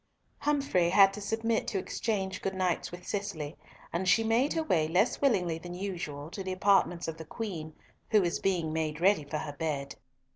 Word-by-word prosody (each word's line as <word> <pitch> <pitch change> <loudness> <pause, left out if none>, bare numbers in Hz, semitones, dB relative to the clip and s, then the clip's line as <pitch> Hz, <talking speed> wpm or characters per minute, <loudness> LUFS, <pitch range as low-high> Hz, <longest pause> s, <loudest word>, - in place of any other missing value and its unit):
Humfrey 275 -13 +2
had 195 +1 +6
to 210 - -7
submit 225 +2 0
to 205 - -1
exchange 190 -1 -2
good 195 0 -2
nights 185 -2 0
with 180 +1 -9
Cicely, 180 -7 -3 0.4
and 185 +2 0
she 225 - +5
made 230 +6 +2
her 325 - 0
way 160 - +2
less 180 +8 +2
willingly 180 - +2
than 175 +1 -8
usual 170 -6 -5
to 195 - -5
the 190 - -3
apartments 185 -2 +2
of 165 -1 -4
the 160 - -7
Queen, 170 -9 -4 0.3
who 215 - +5
was 175 -1 0
being 175 -5 0
made 155 -1 -1
ready 190 -2 +4
for 145 +2 -4
her 150 -1 -5
bed. 145 -2 -3
185 Hz, 190 wpm, -30 LUFS, 160-205 Hz, 0.4 s, had